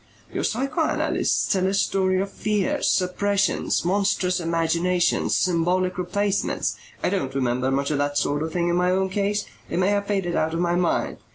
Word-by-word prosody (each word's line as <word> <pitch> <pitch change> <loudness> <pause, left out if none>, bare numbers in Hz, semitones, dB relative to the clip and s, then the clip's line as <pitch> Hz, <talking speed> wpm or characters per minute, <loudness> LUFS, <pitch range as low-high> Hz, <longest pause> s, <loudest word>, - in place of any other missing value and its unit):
"Your - - -2
psychoanalysts 265 +4 0
tell 190 -1 +1
a 195 - 0
story 190 -1 +1
of 195 - -4
fears, 215 +8 0
suppressions, 195 0 +1
monstrous 185 -1 +1
imaginations, 170 +1 +1
symbolic 180 +1 +1
replacements. 200 +3 -1 0.3
I - - +1
don't 135 -9 -2
remember 125 -1 0
much 140 +2 0
of 145 - 0
that 145 0 0
sort 145 +1 0
of 160 +1 -3
thing 175 0 0
in 175 - +1
my 180 0 +2
own 190 +1 +1
case. 205 +2 -1 0.2
It - - -2
may 185 +2 +2
have 205 0 0
faded 190 -4 -1
out 160 +1 0
of - - -1
my 175 0 +1
mind. 175 -1 0
180 Hz, 175 wpm, -24 LUFS, 165-195 Hz, 0.3 s, my